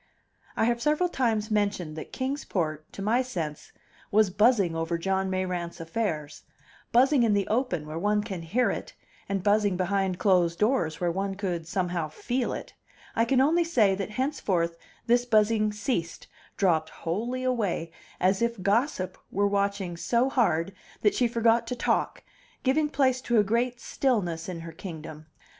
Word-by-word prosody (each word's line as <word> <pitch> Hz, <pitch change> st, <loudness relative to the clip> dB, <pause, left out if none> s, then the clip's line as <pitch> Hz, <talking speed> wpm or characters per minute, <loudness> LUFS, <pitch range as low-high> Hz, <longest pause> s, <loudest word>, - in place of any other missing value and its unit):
I -, -, +2 dB
have 235 Hz, 0 st, +1 dB
several 305 Hz, +7 st, +2 dB
times 225 Hz, -7 st, 0 dB
mentioned 200 Hz, -7 st, 0 dB
that 155 Hz, -, -8 dB
Kings 270 Hz, +2 st, -3 dB
Port, 155 Hz, -4 st, -3 dB
to 195 Hz, -, -6 dB
my 230 Hz, +5 st, +3 dB
sense, 170 Hz, -13 st, -5 dB, 0.4 s
was 210 Hz, -2 st, +3 dB
buzzing 200 Hz, -4 st, +3 dB
over 165 Hz, +1 st, -1 dB
John 190 Hz, +2 st, 0 dB
Mayrant's 180 Hz, -2 st, -3 dB
affairs; 165 Hz, -4 st, -3 dB, 0.5 s
buzzing 265 Hz, +3 st, +5 dB
in 225 Hz, -3 st, +3 dB
the 200 Hz, -1 st, 0 dB
open, 215 Hz, -, 0 dB
where 155 Hz, +2 st, -5 dB
one 210 Hz, +2 st, +1 dB
could 190 Hz, -6 st, -6 dB
hear 240 Hz, +10 st, +2 dB
it, -, -, -6 dB, 0.4 s
and 195 Hz, -2 st, -1 dB
buzzing 205 Hz, -2 st, +3 dB
behind 190 Hz, 0 st, 0 dB
closed 180 Hz, -4 st, +3 dB
doors, 210 Hz, -, +1 dB
where 175 Hz, -1 st, +1 dB
one 195 Hz, +2 st, -2 dB
could 180 Hz, -5 st, -3 dB
somehow 175 Hz, -2 st, -1 dB
feel 245 Hz, +10 st, -2 dB
it; -, -, -6 dB, 0.4 s
I 230 Hz, -, +3 dB
can 255 Hz, +2 st, +2 dB
only 320 Hz, +6 st, +4 dB
say 230 Hz, -12 st, +3 dB
that 195 Hz, +1 st, -3 dB
henceforth 210 Hz, -, -1 dB, 0.3 s
this 240 Hz, +1 st, +3 dB
buzzing 215 Hz, -2 st, +3 dB
ceased, 205 Hz, -5 st, -3 dB, 0.3 s
dropped 160 Hz, -5 st, +2 dB
wholly 235 Hz, +10 st, -3 dB
away, 210 Hz, -10 st, -1 dB, 0.3 s
as 190 Hz, +3 st, +2 dB
if 235 Hz, -5 st, -1 dB
Gossip 205 Hz, -1 st, 0 dB
were 200 Hz, +1 st, +1 dB
watching 200 Hz, -3 st, -1 dB
so 240 Hz, +8 st, +1 dB
hard 195 Hz, -, +1 dB, 0.3 s
that 210 Hz, -, +4 dB
she 245 Hz, -, +2 dB
forgot 230 Hz, 0 st, +2 dB
to 250 Hz, -, -2 dB
talk, 240 Hz, -, 0 dB, 0.4 s
giving 295 Hz, +3 st, +2 dB
place 260 Hz, -3 st, +2 dB
to 240 Hz, -2 st, +1 dB
a 210 Hz, -, +6 dB
great 235 Hz, +4 st, 0 dB
stillness 185 Hz, -14 st, -1 dB
in 170 Hz, -2 st, -5 dB
her 165 Hz, 0 st, -8 dB
kingdom. 155 Hz, -3 st, -9 dB
205 Hz, 165 wpm, -27 LUFS, 175-240 Hz, 0.5 s, a